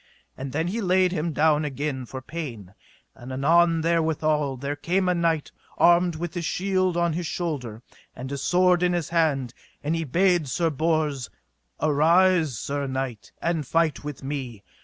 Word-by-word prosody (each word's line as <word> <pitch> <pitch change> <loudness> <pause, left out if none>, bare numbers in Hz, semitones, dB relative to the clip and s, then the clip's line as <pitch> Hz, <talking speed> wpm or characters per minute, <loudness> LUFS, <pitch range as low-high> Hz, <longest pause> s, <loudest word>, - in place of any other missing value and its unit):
And 135 0 -6
then 160 +5 -1
he 225 +5 -2
laid 185 -1 +3
him 170 -1 -1
down 155 0 +3
again 140 -2 -3
for 130 +2 -7
pain; 120 - -7 0.4
and 125 +2 -10
anon 165 +5 +3
therewithal 155 -4 +1
there 140 +3 -3
came 180 +5 0
a 180 - +3
knight 165 -3 0 0.3
armed 175 0 +4
with 170 +1 -5
his 175 -1 -3
shield 185 +1 0
on 170 -1 +1
his 170 0 -3
shoulder 130 -12 -4 0.3
and 130 +2 -7
his 140 - -4
sword 180 0 +3
in 180 0 +2
his 175 -4 -2
hand, 145 -7 +1 0.3
and 155 +3 0
he 165 - -1
bade 175 +2 +2
Sir 165 +5 0
Bors: 150 -4 0 0.5
Arise, 160 - +3
sir 140 +5 -3
knight, 130 -4 -4
and 165 -5 -1
fight 165 -2 +1
with 145 -3 -7
me. 130 -7 -5
155 Hz, 165 wpm, -25 LUFS, 140-170 Hz, 0.5 s, armed